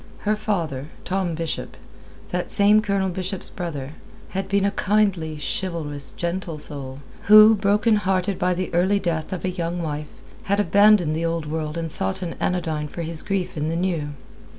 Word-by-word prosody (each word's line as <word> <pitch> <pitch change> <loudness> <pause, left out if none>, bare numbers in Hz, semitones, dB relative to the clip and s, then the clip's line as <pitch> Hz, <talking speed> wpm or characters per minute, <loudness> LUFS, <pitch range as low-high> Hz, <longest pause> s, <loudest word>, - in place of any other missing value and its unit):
Her 215 +1 +1
father, 170 -11 -2 0.2
Tom 185 -3 -1
Bishop 165 0 -4 0.5
that 180 0 -2
same 210 +1 +5
Colonel 200 -3 0
Bishop's 185 +1 -5
brother 145 -7 -5 0.4
had 195 0 -3
been 200 0 +2
a 200 - +2
kindly, 195 -7 +1
chivalrous, 150 -3 -2
gentle 170 +1 -3
soul, 140 -2 -5 0.2
who, 215 +1 +9
broken 210 +2 +3
hearted 190 -1 0
by 180 0 +1
the 185 0 -3
early 185 +4 +3
death 170 -3 -2
of 185 -1 -4
a - - +1
young 175 -1 -3
wife, 150 -1 -4 0.4
had 200 +1 +1
abandoned 200 -4 +5
the 165 +1 -1
Old 165 -1 -1
World 155 +1 -3
and 165 -1 -3
sought 95 - -1
an 170 - -3
anodyne 160 -4 -1
for 170 +3 -6
his 160 -1 -2
grief 185 -2 -2
in 155 0 -1
the 165 - -1
New. 165 -5 -1
175 Hz, 175 wpm, -23 LUFS, 155-195 Hz, 0.5 s, who